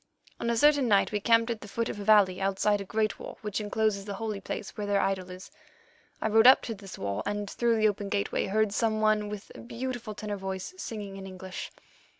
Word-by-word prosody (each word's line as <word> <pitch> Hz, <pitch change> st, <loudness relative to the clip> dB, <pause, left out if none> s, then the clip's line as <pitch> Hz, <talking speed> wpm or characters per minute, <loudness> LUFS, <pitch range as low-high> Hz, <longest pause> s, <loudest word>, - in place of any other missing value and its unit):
"On 235 Hz, -, -1 dB
a 235 Hz, -, +1 dB
certain 290 Hz, 0 st, +5 dB
night 200 Hz, -3 st, +3 dB
we 210 Hz, -, 0 dB
camped 230 Hz, +2 st, +3 dB
at 230 Hz, -, -4 dB
the -, -, -9 dB
foot 230 Hz, +3 st, -2 dB
of 205 Hz, -, -5 dB
a -, -, -4 dB
valley 200 Hz, -3 st, +4 dB
outside 195 Hz, +1 st, +1 dB
a -, -, -3 dB
great 215 Hz, +1 st, -1 dB
wall -, -, -8 dB
which 210 Hz, 0 st, -3 dB
encloses 210 Hz, -1 st, 0 dB
the 200 Hz, 0 st, -5 dB
holy 215 Hz, -1 st, -4 dB
place 195 Hz, 0 st, -5 dB
where 205 Hz, -1 st, -4 dB
their 200 Hz, 0 st, +2 dB
idol 190 Hz, -2 st, -1 dB
is. 185 Hz, +1 st, -10 dB, 0.7 s
I -, -, 0 dB
rode 220 Hz, +2 st, +6 dB
up 260 Hz, -, +8 dB
to 230 Hz, -, -3 dB
this 195 Hz, -2 st, -10 dB
wall 100 Hz, +1 st, -2 dB
and, 205 Hz, 0 st, -2 dB
through 235 Hz, +3 st, +1 dB
the 215 Hz, 0 st, +4 dB
open 205 Hz, -1 st, -2 dB
gateway, 200 Hz, 0 st, -1 dB
heard 215 Hz, +1 st, +1 dB
some 220 Hz, -1 st, +1 dB
one 215 Hz, -1 st, +2 dB
with 210 Hz, -1 st, -8 dB
a -, -, -11 dB
beautiful 240 Hz, -2 st, -5 dB
tenor 205 Hz, -1 st, -4 dB
voice 190 Hz, -, -5 dB
singing 210 Hz, -, -6 dB
in 195 Hz, 0 st, -8 dB
English. 185 Hz, 0 st, -7 dB
210 Hz, 230 wpm, -28 LUFS, 195-220 Hz, 0.7 s, up